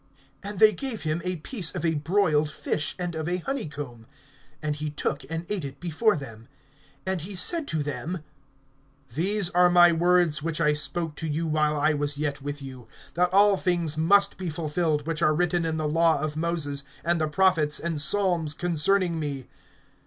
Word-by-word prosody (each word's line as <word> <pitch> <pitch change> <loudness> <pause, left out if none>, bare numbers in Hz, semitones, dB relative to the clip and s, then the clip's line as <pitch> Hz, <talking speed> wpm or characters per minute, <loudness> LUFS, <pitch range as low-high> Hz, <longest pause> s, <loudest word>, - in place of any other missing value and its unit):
(42)And 205 0 -6
they 215 +2 +6
gave 240 +2 -4
him 155 +2 -1
a 180 0 -2
piece 175 - -2
of - - -2
a 165 - +2
broiled 155 -1 +1
fish, 155 0 -2
and 175 -1 -3
of 160 -1 -4
a 180 - 0
honeycomb. 145 - -5 0.6
(43)And 150 -1 -1
he 150 0 -3
took, 150 - -3
and 165 +1 -4
ate 200 -4 -3
it 135 -1 -7
before 180 +6 +1
them. 115 -5 -9 0.6
(44)And 190 -2 -2
he 190 +5 -7
said 320 - +2
to 155 -2 -1
them: 145 +5 -4 0.9
These 190 - 0
are 180 -1 +5
my 175 -1 +7
words 170 -2 +2
which 165 +1 -2
I 150 -2 +3
spoke 160 +2 -1
to 160 - -3
you, 155 +2 -2
while 155 -1 +1
I 155 +2 +3
was 145 -1 -2
yet 145 -2 -2
with 145 0 -6
you, 130 -3 -10 0.3
that 180 +1 +1
all 200 +1 +5
things 170 -5 0
must 175 +6 +3
be 185 -2 -3
fulfilled, 155 -1 -1
which 165 0 -3
are 155 -2 +3
written 175 0 +1
in 160 -1 -2
the 155 -1 -1
law 165 0 +3
of 150 +1 -3
Moses, 155 -4 -2 0.2
and 170 0 +1
the 155 - +1
prophets, 160 -3 +2
and 165 -3 -1
psalms, 175 -4 +1
concerning 175 +1 +1
me. 140 -4 -4
160 Hz, 190 wpm, -26 LUFS, 150-180 Hz, 0.9 s, my